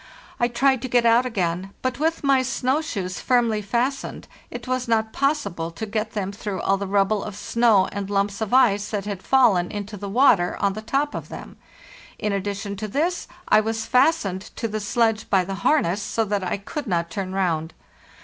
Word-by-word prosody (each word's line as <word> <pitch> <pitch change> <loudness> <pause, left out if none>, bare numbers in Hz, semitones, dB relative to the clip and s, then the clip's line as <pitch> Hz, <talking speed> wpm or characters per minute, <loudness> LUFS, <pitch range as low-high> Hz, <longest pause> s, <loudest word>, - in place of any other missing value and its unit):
I 240 - +3
tried 255 +1 +2
to 260 - -3
get 245 -1 +2
out 235 +2 +4
again, 190 -3 -2
but 255 0 -1
with 325 +1 0
my 275 -2 +4
snow 260 +3 0
shoes 185 -11 -4
firmly 235 -4 +2
fastened 240 +6 -2 0.2
it - - -8
was 255 -1 -1
not 220 -1 +1
possible 275 - -1
to 170 +6 -6
get 215 +1 -3
them 195 -2 -2
through 200 -2 -5
all 195 - +2
the 200 0 -4
rubble 200 +1 +1
of 210 - -6
snow 220 -2 +3
and 200 -1 -4
lumps 200 +1 -1
of 220 - -2
ice 210 -5 +4
that 205 -2 -3
had 200 -3 -4
fallen 200 -10 +3
into 205 0 -6
the 200 +1 -6
water 210 -6 +4
on 200 -1 +1
the 215 - -6
top 275 +6 -1
of - - -6
them. - - -9 0.6
In 210 -2 -1
addition 200 +1 -3
to 215 +2 -4
this, 325 - -1 0.2
I - - +6
was 225 +1 -2
fastened 250 - +2
to 230 - -2
the 215 0 -3
sledge 225 +1 0
by 190 -3 +3
the 195 - -4
harness, 205 - +2
so 225 +2 -1
that 205 -1 -1
I 180 - -1
could 265 +8 -6
not 170 -3 -1
turn 190 0 -4
round. 165 -4 -1
215 Hz, 200 wpm, -23 LUFS, 195-245 Hz, 0.6 s, I